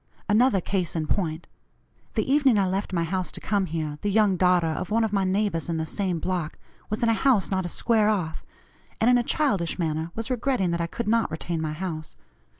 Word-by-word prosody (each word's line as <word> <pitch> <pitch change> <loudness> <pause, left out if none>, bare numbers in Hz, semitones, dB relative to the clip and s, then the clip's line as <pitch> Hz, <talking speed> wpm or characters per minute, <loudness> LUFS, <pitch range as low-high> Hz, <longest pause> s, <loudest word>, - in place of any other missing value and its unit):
Another 220 -1 +4
case 180 -2 -2
in 160 -2 -1
point: 160 -1 -1 0.7
The - - +1
evening 270 -4 +4
I 195 -2 +2
left 195 +2 -2
my 170 -2 0
house 185 +2 -2
to - - -6
come 200 -3 0
here, 155 -2 -4
the 205 - 0
young 205 -1 +3
daughter 180 -1 +3
of 160 +2 -2
one 225 +2 +2
of 220 -2 -1
my 195 -1 +2
neighbors 190 -3 0
in 165 - -1
the 160 - -1
same 185 +1 -2
block, 170 -2 -3 0.3
was 215 +2 -2
in 230 - +4
a - - +4
house 225 -4 +2
not 190 -2 0
a - - -6
square 215 +2 +2
off, 180 -7 -2 0.6
and 230 +3 +4
in 245 - +5
a - - 0
childish 230 - 0
manner 160 -1 -1
was 225 +3 -4
regretting 245 -7 0
that 170 0 -1
I 170 - -1
could 235 +7 -5
not 230 +1 +2
retain 160 +1 -3
my 155 -1 -2
house. 155 -2 -5
190 Hz, 225 wpm, -25 LUFS, 165-215 Hz, 0.7 s, in